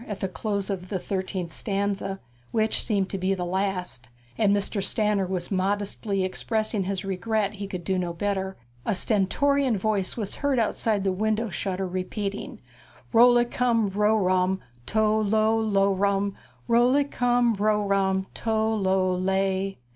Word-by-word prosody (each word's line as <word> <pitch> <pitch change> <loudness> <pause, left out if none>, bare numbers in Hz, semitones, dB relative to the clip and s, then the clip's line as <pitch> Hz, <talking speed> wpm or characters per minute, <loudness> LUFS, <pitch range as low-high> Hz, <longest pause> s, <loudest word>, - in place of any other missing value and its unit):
at 205 -2 -5
the 190 - -1
close 200 +2 -3
of 185 -2 -5
the 195 - -1
thirteenth 185 -2 -3
stanza, 195 -1 -2 0.3
which 220 -1 0
seemed 200 -4 0
to 195 - -4
be 190 +1 +1
the 180 -1 -3
last, 180 -8 -3 0.3
and 210 -3 +3
Mr. 200 0 0
Stanner 210 -1 +1
was 180 0 -3
modestly 200 +1 0
expressing 215 +1 -1
his 195 0 -3
regret 200 +2 -1
that 210 - -13
he 200 0 -5
could 185 -3 -6
do 190 +1 0
no 175 -1 -2
better, 190 +1 -2 0.3
a - - 0
stentorian 245 +6 +2
voice 200 0 -1
was 210 -4 -3
heard 285 -2 +1
outside 220 -2 +1
the 195 - +1
window 220 +3 0
shutter 190 +1 -2
repeating, 190 +3 -4 0.5
Rol' 245 +2 +7
li 240 0 +4
cum 235 -3 +1
ro' 210 +3 +2
rum, 185 -1 +2 0.3
tol' 215 0 +2
lol 220 +2 +2
lo' 200 -2 +2
rum, 200 +1 0 0.3
Rol' 240 +2 +4
li 285 +1 +4
cum 245 -3 +2
ro' 210 0 +1
rum, 190 -1 +1
tol' 220 -1 0
lol 190 -1 +1
lay. 190 +1 0
200 Hz, 160 wpm, -26 LUFS, 190-220 Hz, 0.5 s, Rol